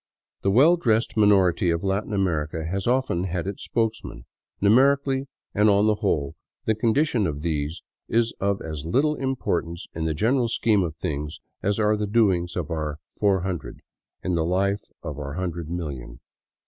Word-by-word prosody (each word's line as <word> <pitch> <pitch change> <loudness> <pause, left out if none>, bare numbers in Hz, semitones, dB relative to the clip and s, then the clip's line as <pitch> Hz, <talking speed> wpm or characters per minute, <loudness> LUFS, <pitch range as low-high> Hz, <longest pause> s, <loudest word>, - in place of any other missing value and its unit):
The 100 - +1
well 145 - +6
dressed 115 -7 +1
minority 100 -3 +4
of 85 +1 0
Latin 100 +2 -1
America 80 -5 -1
has 95 +5 -2
often 125 -8 +1
had 90 -2 -2
its 100 0 -5
spokesman; 110 - -2 0.3
numerically, 135 +5 +3 0.3
and 105 +1 +4
on 100 +1 +4
the 110 - +4
whole, 95 -10 -1 0.3
the 110 - +3
condition 115 - +1
of 75 -1 -4
these 75 -1 -2 0.2
is 115 0 +1
of 100 0 0
as 80 -3 -5
little 135 - +2
importance 110 - -2
in 80 0 -3
the 80 -1 0
general 120 - +2
scheme 110 -3 +2
of 80 -4 -2
things 75 0 -4 0.2
as 100 +2 0
are 105 0 +3
the 105 0 -2
doings 95 -6 +2
of 85 -4 -3
our 75 -2 -2
" - - -53
Four 100 -3 +3
Hundred 90 -2 -5 0.2
" - - -50
in 90 - -1
the 85 -1 +1
life 100 +4 +1 0.2
of 75 -1 -5
our 70 -1 -5
hundred 85 -2 -4
million. 70 -8 -5
95 Hz, 175 wpm, -24 LUFS, 80-110 Hz, 0.3 s, well